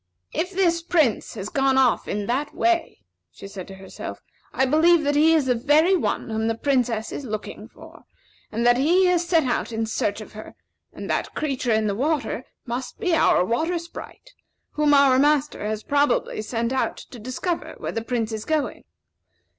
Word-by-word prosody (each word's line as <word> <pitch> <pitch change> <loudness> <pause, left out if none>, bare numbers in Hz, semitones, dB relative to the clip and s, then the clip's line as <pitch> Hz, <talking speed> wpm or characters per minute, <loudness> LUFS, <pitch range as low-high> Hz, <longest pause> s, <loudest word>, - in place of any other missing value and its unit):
"If 360 - -1
this 350 -3 +1
Prince 315 -12 +1
has 200 -1 -5
gone 270 -1 +2
off 260 -3 +3
in 205 0 -2
that 265 +7 -2
way," 345 -1 0 0.3
she - - -11
said 195 -2 -8
to 195 - -10
herself, 190 0 -8 0.3
"I 265 - +1
believe 315 +4 +4
that 290 0 +1
he 320 +2 +5
is 305 -4 +2
the 255 - +2
very 295 +9 +3
one 325 - -2
whom 220 0 -1
the 225 0 -1
Princess 245 -5 0
is - - -5
looking 215 -4 -6
for, - - -16 0.5
and 230 +2 -1
that 240 0 +5
he 350 +7 +4
has 350 -1 +2
set 330 -3 +3
out 245 -2 -1
in 225 0 -1
search 210 -2 -2
of 215 - -11
her; 215 0 -10 0.4
and - - -8
that - - -2
creature 270 -5 -1
in 220 0 +2
the 205 - 0
water 290 +6 -1 0.2
must 245 +1 -5
be 360 - 0
our 250 - +4
Water 320 - 0
Sprite, 340 +8 -10 0.4
whom 300 -1 +3
our 275 -2 +5
master 295 -2 +2
has 215 0 -3
probably 285 -6 +1
sent 230 +2 -2
out 265 - -1
to 245 - -11
discover 255 - -4
where - - -4
the 225 - -3
Prince 230 -1 -2
is 220 -1 -4
going. 310 -2 -2
265 Hz, 190 wpm, -23 LUFS, 225-315 Hz, 0.5 s, he